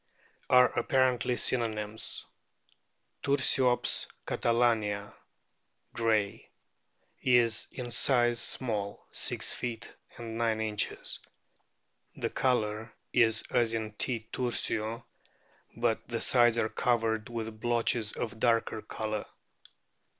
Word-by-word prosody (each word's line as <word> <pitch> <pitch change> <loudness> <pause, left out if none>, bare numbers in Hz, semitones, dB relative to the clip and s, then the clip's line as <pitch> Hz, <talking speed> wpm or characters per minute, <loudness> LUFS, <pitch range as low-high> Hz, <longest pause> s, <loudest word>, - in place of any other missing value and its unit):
are 125 0 +8
apparently 125 -2 +2
synonyms. 110 -3 -2 1.0
Tursiops 135 -3 +2 0.2
catalania, 110 -4 +1 0.8
Gray,* 110 -3 0 0.7
is 120 -3 +3
in 125 -2 -6
size 120 -1 +3
small 105 -5 -3
(6 - - +1
feet 115 -3 -5 0.2
9 115 -1 -1
inches). 110 -1 -1 1.0
The - - -3
colour 110 -3 0 0.2
is 115 -3 +4
as 115 -1 +2
in 110 -1 -3
T. 110 +1 -2
tursio, 115 -2 -2 0.7
but 115 -1 0
the 115 -1 -2
sides 120 -2 +5
are 110 -1 +1
covered 115 -2 0
with 110 -2 -5
blotches 115 -2 +1
of 110 -1 -4
darker 115 -2 +1
colour. 110 -1 -4
115 Hz, 90 wpm, -30 LUFS, 110-120 Hz, 1.0 s, are